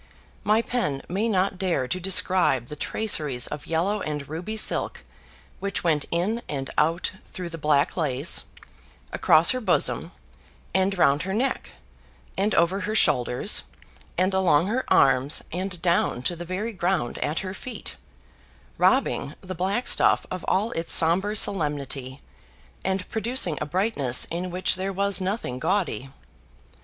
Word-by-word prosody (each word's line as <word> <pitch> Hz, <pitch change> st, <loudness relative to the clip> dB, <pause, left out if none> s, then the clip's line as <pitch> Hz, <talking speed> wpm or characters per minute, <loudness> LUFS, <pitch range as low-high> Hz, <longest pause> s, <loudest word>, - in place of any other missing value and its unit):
My 215 Hz, +2 st, +3 dB
pen 150 Hz, -, -2 dB
may 200 Hz, +6 st, -1 dB
not 190 Hz, -3 st, 0 dB
dare 175 Hz, -9 st, 0 dB
to 185 Hz, -, -2 dB
describe 185 Hz, -8 st, +2 dB
the 150 Hz, -, -6 dB
traceries 150 Hz, -, 0 dB
of 150 Hz, -, -6 dB
yellow 190 Hz, +6 st, 0 dB
and 150 Hz, -2 st, -4 dB
ruby 180 Hz, +8 st, -5 dB
silk -, -, -1 dB, 0.6 s
which 200 Hz, 0 st, -3 dB
went 155 Hz, -4 st, +1 dB
in 200 Hz, +8 st, -1 dB
and 135 Hz, -2 st, -4 dB
out 165 Hz, +3 st, +1 dB, 0.2 s
through 180 Hz, -2 st, -6 dB
the 165 Hz, -1 st, -8 dB
black 145 Hz, -1 st, +2 dB
lace, 145 Hz, -3 st, +1 dB, 0.7 s
across 160 Hz, +2 st, +5 dB
her 255 Hz, -, -2 dB
bosom, 220 Hz, -, +1 dB, 0.6 s
and 190 Hz, +1 st, +1 dB
round 140 Hz, -3 st, +3 dB
her 190 Hz, +3 st, -3 dB
neck, 260 Hz, +5 st, -2 dB, 0.6 s
and 205 Hz, +3 st, 0 dB
over 170 Hz, +4 st, +2 dB
her 215 Hz, +1 st, -3 dB
shoulders, 125 Hz, -, +2 dB, 0.5 s
and 185 Hz, +2 st, +2 dB
along 180 Hz, -4 st, +3 dB
her 240 Hz, +6 st, -1 dB
arms, 135 Hz, +2 st, +3 dB
and 185 Hz, +1 st, -3 dB
down 170 Hz, -8 st, +1 dB
to 175 Hz, -, -1 dB
the 175 Hz, +1 st, -7 dB
very 200 Hz, +6 st, -4 dB
ground 180 Hz, -, -1 dB
at 150 Hz, +3 st, -1 dB
her 185 Hz, -1 st, -5 dB
feet, 230 Hz, +2 st, -6 dB, 0.8 s
robbing 140 Hz, -, +2 dB
the 185 Hz, -1 st, -6 dB
black 190 Hz, +7 st, -1 dB
stuff -, -, +3 dB
of 185 Hz, -1 st, -5 dB
all 210 Hz, +5 st, +1 dB
its 165 Hz, -4 st, -2 dB
sombre 190 Hz, +6 st, +6 dB
solemnity, 145 Hz, -9 st, -2 dB, 0.6 s
and 190 Hz, -1 st, -2 dB
producing 220 Hz, -7 st, +2 dB
a -, -, -2 dB
brightness 150 Hz, -, +1 dB
in 175 Hz, +2 st, -3 dB
which 185 Hz, +1 st, 0 dB
there 190 Hz, +1 st, -2 dB
was 200 Hz, 0 st, 0 dB
nothing 185 Hz, -, -3 dB
gaudy. 165 Hz, -, -1 dB
180 Hz, 150 wpm, -25 LUFS, 150-200 Hz, 0.8 s, sombre